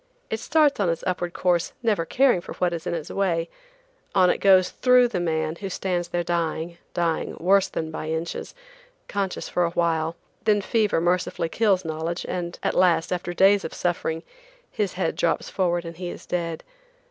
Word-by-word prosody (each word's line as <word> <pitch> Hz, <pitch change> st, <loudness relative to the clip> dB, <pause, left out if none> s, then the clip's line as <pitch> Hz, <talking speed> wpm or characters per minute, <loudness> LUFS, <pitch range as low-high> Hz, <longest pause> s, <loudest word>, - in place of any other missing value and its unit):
It 220 Hz, -, -1 dB
starts 295 Hz, 0 st, +3 dB
on 195 Hz, -4 st, +2 dB
its 165 Hz, 0 st, -2 dB
upward 175 Hz, -1 st, -2 dB
course 175 Hz, -2 st, +1 dB
never 210 Hz, -7 st, +1 dB
caring 255 Hz, -3 st, +3 dB
for -, -, -8 dB
what 175 Hz, -1 st, 0 dB
is 165 Hz, -1 st, -5 dB
in -, -, -1 dB
its 160 Hz, -3 st, -5 dB
way; 170 Hz, -4 st, 0 dB, 0.6 s
on 185 Hz, -2 st, +5 dB
it -, -, -2 dB
goes 190 Hz, -2 st, +5 dB
through 250 Hz, -1 st, +4 dB
the 200 Hz, -6 st, -2 dB
man 160 Hz, -1 st, -1 dB
who 195 Hz, +1 st, -5 dB
stands 180 Hz, -2 st, -2 dB
there 175 Hz, 0 st, -1 dB
dying, 170 Hz, 0 st, -2 dB, 0.2 s
dying, 170 Hz, -2 st, -1 dB
worse 190 Hz, +3 st, +4 dB
than 160 Hz, -1 st, -4 dB
by 155 Hz, -, -5 dB
inches, 160 Hz, -, -4 dB, 0.5 s
conscious 195 Hz, -2 st, -2 dB
for 180 Hz, -, 0 dB
a 170 Hz, -, +2 dB
while, 165 Hz, -1 st, 0 dB, 0.3 s
then 210 Hz, -2 st, +3 dB
fever 210 Hz, -2 st, +1 dB
mercifully 175 Hz, -1 st, 0 dB
kills 195 Hz, -2 st, +2 dB
knowledge, 160 Hz, +2 st, -3 dB
and 175 Hz, -1 st, -4 dB
at -, -, +1 dB
last, 180 Hz, -2 st, +3 dB
after 175 Hz, 0 st, -3 dB
days 195 Hz, +3 st, +4 dB
of -, -, -6 dB
suffering, 165 Hz, -2 st, -1 dB, 0.5 s
his 205 Hz, -3 st, -1 dB
head 180 Hz, -3 st, -1 dB
drops 165 Hz, -, 0 dB
forward, 175 Hz, -2 st, 0 dB
and 165 Hz, -1 st, -8 dB
he 180 Hz, -1 st, -4 dB
is -, -, -9 dB
dead. 170 Hz, -2 st, -3 dB
175 Hz, 185 wpm, -24 LUFS, 165-195 Hz, 0.6 s, on